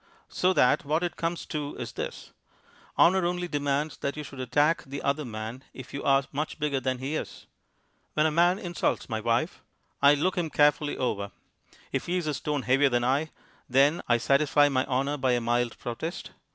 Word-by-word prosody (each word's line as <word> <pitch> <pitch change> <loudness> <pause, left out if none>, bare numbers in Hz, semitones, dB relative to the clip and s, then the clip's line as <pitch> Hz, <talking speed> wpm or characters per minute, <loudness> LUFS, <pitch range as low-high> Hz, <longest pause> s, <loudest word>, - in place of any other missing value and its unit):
"So 185 - +2
that 125 - +3
what 155 +4 0
it 175 - -2
comes 165 0 -3
to 150 -2 -4
is - - -6
this. - - -6 0.7
Honour 185 +2 +5
only 175 0 -1
demands 145 0 -1
that 140 +2 -3
you 150 - -4
should 135 -2 -10
attack 145 +6 +2
the 140 0 -7
other 140 +2 0
man 110 +3 -6
if 130 - -10
you 140 - -4
are 135 0 +4
much 150 +3 -3
bigger 150 -3 0
than 130 0 -1
he 135 +4 -3
is. - - -6 0.7
When 155 - +3
a 160 - +2
man 175 +4 +3
insults 175 -7 -2
my 110 -2 -2
wife, 120 - 0 0.4
I 140 +1 +7
look 180 +5 0
him 165 -2 -1
carefully 150 0 +2
over; 100 -5 -2 0.6
if - - -2
he 180 +1 0
is 175 - -2
a 150 - -1
stone 145 -1 -2
heavier 135 +2 +3
than 120 -1 +1
I, 140 +5 +1 0.4
then 140 +6 +4
I 120 - +4
satisfy 145 +3 +3
my 130 -2 0
honour 135 +2 0
by 130 -2 +1
a 120 - +2
mild 120 0 0
protest. 140 +9 -5
145 Hz, 195 wpm, -27 LUFS, 130-155 Hz, 0.7 s, I